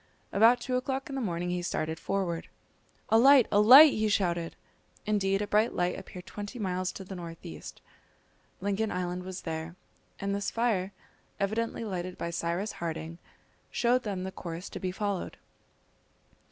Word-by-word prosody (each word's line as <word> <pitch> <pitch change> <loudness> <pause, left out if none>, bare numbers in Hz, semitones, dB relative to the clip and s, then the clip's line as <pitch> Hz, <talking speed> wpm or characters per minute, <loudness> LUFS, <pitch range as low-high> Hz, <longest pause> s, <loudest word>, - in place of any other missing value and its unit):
About 230 +4 +6
two 250 0 -1
o'clock 265 +2 -3
in - - -6
the 270 - -2
morning 175 -4 -2
he 180 0 -1
started 160 -2 -2
forward, 185 -4 -2 0.6
"A 225 +1 +5
light! 270 -1 +7
a 205 - +4
light!" 270 +8 +10
he 215 0 +1
shouted. 175 -4 0 0.5
Indeed, 200 -1 +1
a - - -4
bright 215 +3 +2
light 180 0 0
appeared 180 -1 -9
twenty 205 +4 -7
miles 185 -3 -1
to 195 - -8
the 190 - -8
north 170 -2 -8
east. 80 -2 -9 0.8
Lincoln 205 +2 -1
Island 180 0 -2
was 185 0 -7
there, 160 +1 -5 0.4
and 200 0 -2
this 200 0 -1
fire, 215 -5 0 0.5
evidently 225 +3 -1
lighted 185 -3 -4
by 170 - -3
Cyrus 170 +5 -2
Harding, 165 0 -5 0.5
showed 245 +1 +2
them 200 -5 -4
the 190 - -4
course 170 0 -7
to - - -7
be 185 - -2
followed. 200 -1 -3
195 Hz, 165 wpm, -29 LUFS, 175-215 Hz, 0.8 s, light